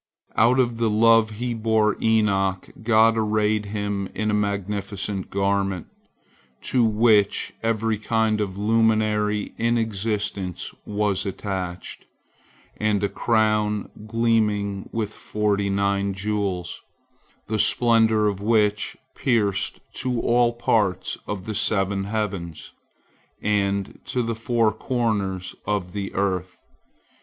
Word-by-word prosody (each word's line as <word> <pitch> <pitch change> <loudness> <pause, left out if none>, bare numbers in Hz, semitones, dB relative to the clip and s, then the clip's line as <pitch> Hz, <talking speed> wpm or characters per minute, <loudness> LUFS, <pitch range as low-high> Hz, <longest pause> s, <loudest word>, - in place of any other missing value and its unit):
Out 120 +3 +4
of 120 -2 +1
the 115 -1 +1
love 115 +1 +5
He 120 +3 -3
bore 110 -1 +2
Enoch, 100 -4 +1
God 115 0 +4
arrayed 105 -1 +1
him 100 -1 -3
in 110 0 0
a - - -1
magnificent 100 -1 -2
garment, 100 -2 0 0.8
to 125 -2 +2
which 110 -2 +3
every 115 -1 0
kind 110 -1 +1
of 95 -2 -3
luminary 105 -1 +1
in 115 +1 +2
existence 105 -4 -2
was 105 -2 0
attached, 95 -2 -5 0.7
and 105 -2 +1
a 100 - +1
crown 110 -2 +1 0.2
gleaming 105 -3 0
with 110 -2 -3
forty 105 -2 -1
nine 100 0 0
jewels, 95 -3 -2 0.6
the 110 0 -2
splendor 110 -1 +3
of 100 -1 -2
which 105 -1 +1 0.2
pierced 105 -6 0 0.2
to 125 -2 -1
all 120 0 +3
parts 105 -6 0
of 95 -3 -4
the 110 - -3
seven 100 -2 +1
heavens 100 -7 -4 0.7
and 100 -2 -1
to 125 - -1
the 115 0 -1
four 115 -1 +1
corners 105 -6 -2
of 95 -4 -2
the 100 -2 -4
earth. 95 -2 -1
105 Hz, 115 wpm, -23 LUFS, 100-110 Hz, 0.8 s, love